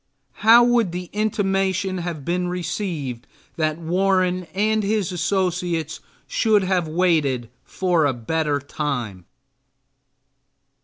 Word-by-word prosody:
How 230 +3 +8
would 235 -7 +2
the 180 0 -6
intimation 195 -3 0
have 170 -5 -5
been 180 +1 -1
received 170 - -4 0.3
that 155 -1 0
Warren 185 +1 +1
and 215 +2 +2
his 205 -3 0
associates 175 -3 -1 0.3
should 215 -3 +2
have 185 -3 0
waited 155 -8 +1 0.3
a 170 -6 +3
better 145 +5 -1
time? 125 - -4
180 Hz, 100 wpm, -22 LUFS, 155-195 Hz, 0.3 s, How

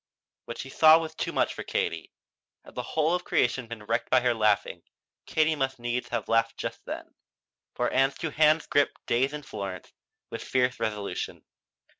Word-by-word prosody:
What 120 - -7
she 135 - -6
saw 155 +2 +7
was 160 -1 -4
too - - -3
much - - +1
for - - -7
Katie. 80 -1 -2 0.5
Had - - -14
the - - -3
whole 160 +1 0
of 180 - 0
creation 120 0 +1
been 115 -2 -8
wrecked 115 +2 -1
by 130 - +5
her 120 -1 +2
laughing, 105 -3 +1 0.5
Katie 155 0 +2
must 135 -2 -1
needs 120 +1 -3
have - - -2
laughed 115 0 +2
just - - -5
then. - - -7 0.6
For 120 - +1
Ann's 135 +1 +2
two 160 -3 -3
hands 155 +2 +4
gripped 145 -1 +1
"Days 130 +4 +1
in 150 0 -6
Florence" 95 -7 -7 0.4
with - - -5
fierce 125 -1 +1
resolution. 105 -2 -4
125 Hz, 180 wpm, -27 LUFS, 115-150 Hz, 0.6 s, saw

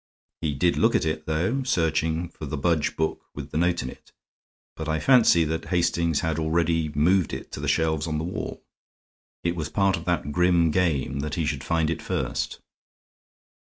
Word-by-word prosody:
He 75 -3 -1
did 85 +6 +2
look - - +3
at - - +2
it, 80 -1 -3
though, 90 - 0
searching 80 - 0
for 80 -3 -8
the 75 - -3
Budge 80 +1 +1
book 80 0 -2
with 70 -1 -7
the - - -2
note 85 -2 +1
in 65 - -4
it, - - -17 0.6
but 80 0 -5
I 80 0 0
fancy 115 -6 +5
that 80 +1 -2
Hastings 85 -3 +1
had 80 -1 -1
already 80 0 +1
moved 85 +3 +3
it - - -6
to - - -6
the - - -3
shelves 80 -1 +1
on 80 -1 -1
the 80 - -2
wall. 90 +3 -5 0.8
It 85 0 0
was 80 -4 -3
part 95 -2 +2
of 85 - -9
that 85 -5 -1
grim 85 0 +3
game 75 -6 0
that 75 +1 -3
he 80 - -1
should 70 -3 -2
find 80 -1 +1
it 80 - -3
first. - - -2
80 Hz, 195 wpm, -25 LUFS, 75-85 Hz, 0.8 s, fancy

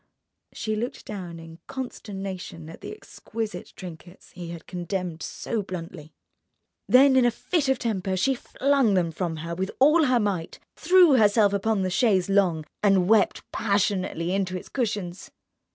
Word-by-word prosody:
_" - - -44 0.5
She 215 0 -2
looked 235 +4 -4
down 180 -5 -7
in 165 0 -12
consternation 195 -9 -6
at - - -13
the - - -7
exquisite 225 - -6
trinkets 175 0 -11
he 175 -1 -8
had 170 -1 -8
condemned 180 -2 -4
so 230 -2 -3
bluntly. 165 -4 -8 0.8
Then 265 +1 +6
in 260 - +5
a 240 - +5
fit 285 +4 -1
of 265 - +3
temper 195 -5 -2
she 270 +9 +2
flung 265 -3 +1
them 175 -3 +1
from 165 0 -3
her 170 - -4
with 190 +3 -2
all 305 +4 +5
her 255 -2 +3
might, 195 -6 -2 0.2
threw 350 -5 +5
herself 210 -2 +4
upon 200 0 +1
the 185 - -1
chaise 200 -3 +2
longue, 180 -6 +2 0.2
and 195 -3 +3
wept 215 -2 +3
passionately 190 -4 0
into 185 -2 -1
its - - -10
cushions. 205 -7 -3
195 Hz, 160 wpm, -25 LUFS, 180-235 Hz, 0.8 s, Then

